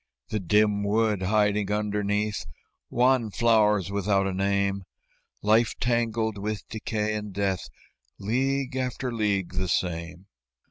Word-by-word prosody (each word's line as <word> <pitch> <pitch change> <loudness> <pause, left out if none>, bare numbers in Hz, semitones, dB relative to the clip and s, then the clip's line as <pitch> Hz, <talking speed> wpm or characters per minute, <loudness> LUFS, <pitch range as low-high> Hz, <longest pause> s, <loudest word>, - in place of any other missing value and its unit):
The 105 - -1
dim 105 +2 +2
wood 105 -1 +1
hiding 105 +1 +1
underneath 105 -2 -1 0.4
Wan 125 -2 +3
flowers 105 -3 +3
without 100 -1 +1
a 95 - -1
name; 100 +1 0 0.6
Life 110 +2 +3
tangled 115 -3 0
with 105 -1 -4
decay 110 -1 -2
and 105 -1 -4
death, 95 -1 -2 0.5
League 135 +5 -1
after 130 0 -2
league 100 -5 0
the 95 0 -1
same. 85 +1 -2
105 Hz, 120 wpm, -26 LUFS, 100-110 Hz, 0.6 s, Wan